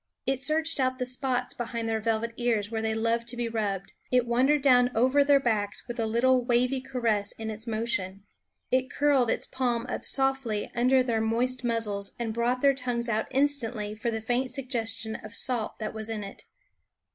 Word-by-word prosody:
It 265 0 0
searched 315 +3 +1
out 255 -1 +1
the 250 - -2
spots 250 0 -1
behind 235 -1 -4
their 225 0 0
vel 220 0 0
vet 230 0 -4
ears, 230 -4 0
where 225 -1 -2
they 220 0 -1
love 230 +1 0
to 240 +1 -2
be 240 -1 -1
rubbed; 205 -4 -3 0.2
it 250 -1 +3
wandered 265 +5 +2
down 250 -3 +5
over 260 +5 +4
their 280 0 +5
backs 215 -5 -1
with 240 -1 -6
a 225 - +1
little 250 +3 +3
wavy 250 +2 +1
caress 235 -6 -1
in 220 0 -5
its 220 +2 -8
motion; 205 -4 -2 0.5
it 255 +1 +2
curled 275 -4 +2
its - - 0
palm 245 -3 -1
up - - -4
softly 265 -6 0
under 255 +2 +3
their 230 -3 0
moist 250 +3 0
muzzles 210 -4 0
and 230 -2 -3
brought 240 +2 0
their 280 -1 +5
tongues 245 -2 -2
out 220 -1 0
instantly 250 -6 -1
for 220 +2 -3
the 225 -1 -3
faint 245 +3 -1
suggestion 230 -4 -2
of 215 +1 -10
salt 240 -4 0
that 215 -1 -4
was 220 0 -2
in 215 -2 -3
it. 200 - -10
235 Hz, 195 wpm, -27 LUFS, 220-255 Hz, 0.5 s, down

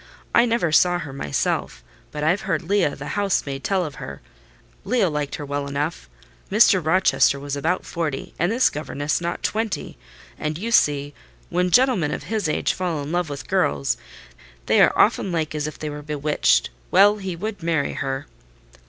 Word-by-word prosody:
I 235 - +6
never 230 -8 +1
saw 175 +3 +4
her 145 -6 -7
myself; 75 - -2 0.3
but 150 0 -4
I've 175 +6 +2
heard - - -1
Leah, 180 -5 +1
the 145 +1 -7
house 200 -2 0
maid, 135 -1 -5
tell 190 -2 +1
of 150 - -8
her. 70 -1 -7 0.6
Leah 225 -9 +1
liked 150 -1 -2
her 150 - -6
well 140 0 -3
enough. 140 - -3 0.4
Mr. 200 -3 +5
Rochester 145 -5 +3
was 145 0 -4
about 165 +6 -1
forty, 160 -5 -4
and 175 +4 +2
this 245 +3 +3
governess 150 +1 -2
not 170 0 -3
twenty; 220 -1 -2 0.4
and 155 0 -2
you 225 +6 -4
see, 145 -8 +3 0.4
when 180 +1 +1
gentlemen 245 - +3
of - - -4
his 215 -7 -2
age - - 0
fall 170 -5 -2
in 145 - -6
love 175 -2 0
with 140 -1 -7
girls, 70 -4 +1 0.7
they - - +4
are - - +6
often 190 - +3
like 160 -3 -1
as 150 -1 -2
if 155 - -7
they 155 -1 -5
were 150 0 -7
bewitched. 145 - +1 0.2
Well, 205 +1 +5
he 190 -3 -5
would 205 +3 -5
marry 165 -3 0
her." 135 0 -3
155 Hz, 180 wpm, -23 LUFS, 145-185 Hz, 0.7 s, I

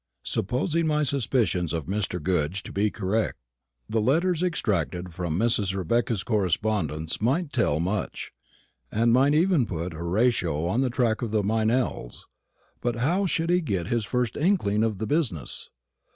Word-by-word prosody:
Supposing 155 - 0
my 150 0 +2
suspicions 120 - +1
of 80 -4 -2
Mr. 95 0 -2
Goodge 90 +2 -1
to - - -8
be 105 +2 +1
correct, 105 +3 -1 0.5
the 110 0 0
letters 165 +8 +2
extracted 100 - -1
from 85 -2 -2
Mrs. 105 -3 +1
Rebecca's 110 +2 0
correspondence 90 -6 -1
might 145 +7 0
tell 95 - +1
much, 95 +5 -3 0.6
and 115 +2 +3
might 135 +4 +4
even 165 - +3
put 85 -2 -4
Horatio 85 -2 0
on 110 +9 +1
the 130 - +1
track 120 -3 0
of 120 - -2
the 105 -1 +1
Meynells. 110 - -1 0.6
But 120 -1 -1
how 170 +12 +1
should 165 0 0
he 180 0 +3
get 95 - -2
his 120 -2 +1
first 125 +2 -1
inkling 145 - +1
of 110 -3 0
the 110 - -3
business? 115 - -1
110 Hz, 150 wpm, -26 LUFS, 90-130 Hz, 0.6 s, might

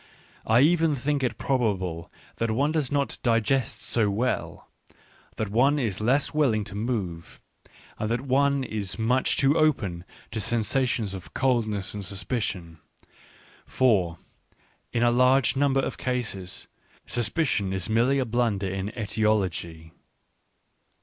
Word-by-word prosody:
I 115 +3 +5
even 165 0 +3
think 140 +2 -1
it 125 - -1
probable 95 - -1 0.3
that 115 - -1
one 140 +7 +1
does 155 -5 -1
not 140 -1 -1
digest 115 +2 +1
so 110 -3 +1
well, 115 +6 -2 0.7
that 110 - -3
one 130 +8 +3
is 110 -8 -2
less 135 +6 +1
willing 130 -9 +2
to 105 0 -8
move, 100 -7 -4 0.6
and 110 - -2
that 120 +1 0
one 140 +1 +2
is 105 -5 -4
much 125 +4 +2
too 140 +2 +3
open 105 - +1 0.3
to 110 - -3
sensa 120 +5 +1
tions 110 -5 -2
of 95 -2 -9
coldness 110 -7 0
and 105 -1 -5
suspicion; 95 -4 -3 0.9
for, 95 -10 +2 0.7
in 120 - 0
a 120 - +4
large 125 +2 +4
number 135 -1 +2
of - - -4
cases, 110 -8 -3 0.4
suspicion 120 - 0
is 95 -1 -1
merely 120 +5 +2
a 130 - +1
blunder 115 -4 0
in 95 +1 -3
etiology. 95 -7 -1
115 Hz, 135 wpm, -26 LUFS, 100-130 Hz, 0.9 s, I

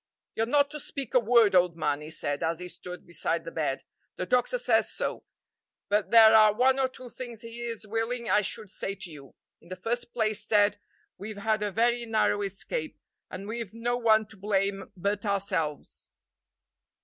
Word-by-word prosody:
"You're 225 - 0
not 285 +2 +3
to 300 - -5
speak 275 -4 -6
a 255 - +6
word, 230 -3 +4
old 180 -2 +3
man," 150 -2 0
he 150 - -8
said, 145 -2 -2
as 165 0 0
he 180 +1 -7
stood 180 +1 -9
beside 170 -1 -2
the 165 - -6
bed; 150 -4 -2 0.3
"the 185 - -3
doctor 250 - +1
says - - +2
so; - - -4 0.6
but 205 0 +1
there 225 -1 +8
are 215 -1 +7
one 260 +3 +3
or 265 - +3
two 255 -1 -12
things 240 -2 -8
he 230 +1 -8
is 230 -2 -5
willing 225 +2 -2
I 210 - +4
should 210 0 -5
say 195 - -4
to 195 -3 -8
you. 140 -3 -13 0.3
In 170 - -19
the 185 - -5
first 235 +6 -3
place, 215 -3 0
Ted, 205 -1 +3 0.4
we've 210 +2 -7
had 215 +1 0
a 210 - 0
very 235 +3 +1
narrow 215 -2 +2
escape, 200 - -3 0.3
and 195 +2 -7
we've 225 -1 -5
no 240 +1 -1
one 220 -2 +3
to 220 - -14
blame 195 0 -1
but 200 +3 -1
ourselves. 190 -7 -2
210 Hz, 190 wpm, -28 LUFS, 185-235 Hz, 0.6 s, there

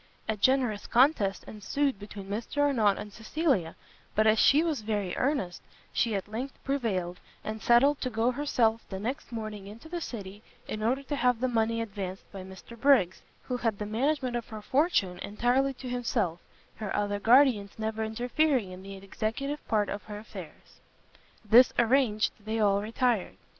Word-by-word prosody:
A 220 - 0
generous 240 -1 +1
contest 235 -6 +3
ensued 255 +4 -2
between 205 -1 -8
Mr 220 +7 -5
Arnott 225 -9 +3
and 210 -1 -8
Cecilia, 225 - 0 0.4
but 215 - +3
as 215 0 +4
she 295 +3 +5
was 315 -7 -1
very 210 -4 -2
earnest, 250 -11 -1 0.3
she 225 -3 +1
at 195 - -3
length 245 +6 -5
prevailed, 200 -11 -1 0.2
and 215 0 -5
settled 275 +5 +4
to 255 - -1
go 230 +1 +1
herself 240 -5 +1
the 190 - -4
next 255 +9 -4
morning 215 -3 -6
into 220 +8 -11
the 345 +1 -4
city, 205 -7 -7 0.3
in 215 - -4
order 255 +5 0
to 290 +2 -3
have 250 -3 +2
the 255 - +1
money 230 -1 +1
advanced 195 -4 -5
by 195 - -7
Mr 190 +5 -11
Briggs, 235 -8 +3 0.2
who 250 - -3
had 225 -4 -1
the 210 - -4
management 255 +3 0
of 240 -2 -3
her 215 -1 -8
fortune 240 - +1
entirely 245 +7 +1
to 255 - -8
himself, 230 -8 -1 0.4
her 215 -2 -4
other 205 0 0
guardians 230 -3 +4
never 220 0 -2
interfering 245 0 0
in 185 0 -9
the 195 +1 -8
executive 220 +9 -4
part 210 -2 +2
of 205 - -4
her 210 -1 -7
affairs. 215 - -11 0.7
This 235 +4 +7
arranged, 235 -3 +3
they 220 +1 -2
all 200 -2 +3
retired. 230 -1 0
225 Hz, 170 wpm, -29 LUFS, 205-255 Hz, 0.7 s, This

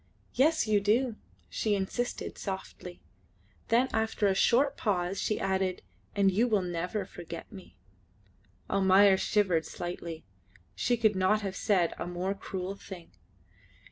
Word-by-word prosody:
"Yes, 310 +2 +3
you 215 -2 +3
do," 225 +4 +2 0.3
she 215 -2 0
insisted 200 +5 -3
softly; 190 -2 -7 0.6
then 240 +3 +3
after 220 -1 0
a 195 - +4
short 270 +8 +3
pause 185 -3 -1
she 215 - -1
added, 190 -1 -1 0.3
"and 200 -1 +4
you 220 +6 +2
will 210 -5 +2
never 180 +3 -3
forget 170 -3 -9
me." 190 -4 -13 0.9
Almayer 195 0 +5
shivered 190 -5 +1
slightly. 170 - -6 0.5
She 245 -1 0
could 220 -3 +3
not 190 +3 +2
have 195 -2 -4
said 185 -6 +1
a - - -3
more 180 +2 -2
cruel 195 -1 -5
thing. 185 -4 -11
195 Hz, 135 wpm, -29 LUFS, 185-215 Hz, 0.9 s, Almayer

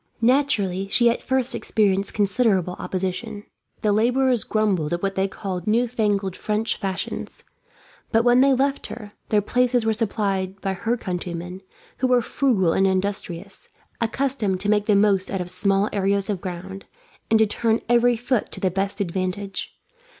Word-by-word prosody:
Naturally, 225 -8 +2
she 235 +4 +4
at 235 - -4
first 260 -1 +1
experienced 200 -2 +1
considerable 200 -3 +1
opposition. 195 +3 -4 0.4
The 210 - +3
labourers 245 +3 +2
grumbled 195 -8 0
at 175 - -3
what 195 0 0
they 190 0 0
called 185 -1 -5
new 235 +3 +2
fangled 205 -5 -1
French 215 +2 -1
fashions; 195 -3 -5 0.7
but 225 0 +3
when 245 +1 +5
they 275 +1 +5
left 275 +2 0
her, 210 -3 -9 0.2
their 210 -2 +2
places 245 +1 +1
were 220 - +2
supplied 195 -4 -1
by 195 -1 -2
her 225 +6 -1
countrymen, 180 -2 -5 0.4
who 255 - +1
were 250 -1 +3
frugal 210 -11 +1
and 195 - +3
industrious, 190 -1 -3 0.3
accustomed 230 -5 0
to 205 - -1
make 210 -1 +2
the 210 - +4
most 200 -2 +3
out 195 - -2
of 180 0 -5
small 195 +2 +2
areas 200 0 +1
of 190 -3 -4
ground, 190 +2 -7 0.4
and 225 - +5
to 220 - +5
turn 225 +2 0
every 240 +1 +4
foot 245 -1 -1
to - - -6
the 185 - 0
best 195 +2 -2
advantage. 190 +2 -3
205 Hz, 165 wpm, -23 LUFS, 190-235 Hz, 0.7 s, when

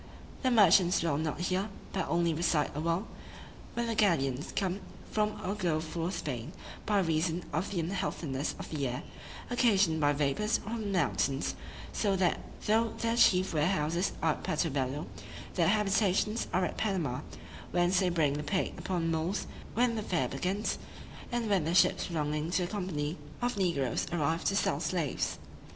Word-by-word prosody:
The 260 - +2
merchants 190 -6 +5
dwell 155 -3 +1
not 160 +2 -2
here, 185 +3 0 0.2
but 190 - -1
only 170 0 +2
reside 160 -2 +1
a 145 - -4
while, 170 +5 0 0.7
when 235 - 0
the 230 - -1
galleons 150 - +1
come 190 0 0 0.3
from 210 0 0
or 190 - 0
go 175 -7 0
for 165 +2 -3
Spain, 145 - -4 0.3
by 205 -1 +3
reason 165 0 0
of 165 +6 0
the 180 -4 -1
unhealthiness 160 -6 -2
of - - -8
the 145 -4 -1
air, 125 +1 -4 0.5
occasioned 200 -10 +3
by 145 0 +4
vapors 145 +9 +1
from 225 +2 -5
the 210 - -3
mountains; 140 - +1 0.4
so 200 -3 +1
that 185 -2 +2 0.3
though 225 +1 +2
their 230 0 0
chief 185 -6 +4
warehouses 160 +2 +1
are 160 - +4
at - - -5
Puerto 155 +1 0
Bello, 135 +2 -1 0.5
their 170 -3 +2
habitations 210 +1 +2
are 185 - +2
at - - -4
Panama, 175 - 0 0.5
whence 175 +1 +3
they 185 -2 +2
bring 160 -5 +2
the 150 +1 -3
plate 185 +6 0
upon 170 -3 -1
mules 165 +5 -1 0.3
when 240 +1 +3
the 220 - -2
fair 170 -10 0
begins, 185 - -1 0.5
and 240 -2 -1
when 195 -5 +2
the 165 +3 0
ships 185 - +4
belonging 150 -1 -1
to 180 +1 +1
the 175 - -7
company 175 -6 -2 0.2
of 245 0 0
negroes 165 - 0
arrive 165 0 0
to 195 - +2
sell - - +1
slaves. - - -1
175 Hz, 170 wpm, -31 LUFS, 155-200 Hz, 0.7 s, merchants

